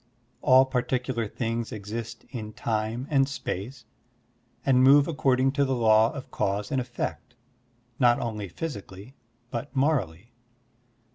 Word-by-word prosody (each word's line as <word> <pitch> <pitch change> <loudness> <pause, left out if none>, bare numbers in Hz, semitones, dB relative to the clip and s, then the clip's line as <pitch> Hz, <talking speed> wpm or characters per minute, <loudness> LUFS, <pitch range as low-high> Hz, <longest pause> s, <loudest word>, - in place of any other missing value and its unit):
All 130 +1 +6
partictdar 125 -3 -1
things 115 -1 -3
exist 115 +3 -6
in 110 -4 -6
time 110 +1 -2
and 135 -1 +3
space 120 -1 -5 0.8
and 130 -2 +4
move 140 +2 +7
according 135 -4 +2
to 140 +1 +1
the 135 -1 0
law 110 -1 +4
of 140 -3 -9
cause 100 +1 -1
and 135 - +1
effect, 120 0 -5 0.6
not 120 -2 +5
only 105 -5 -4
physically 100 - -7 0.4
but 125 +4 -5
morally. 120 - 0
120 Hz, 125 wpm, -26 LUFS, 110-135 Hz, 0.8 s, move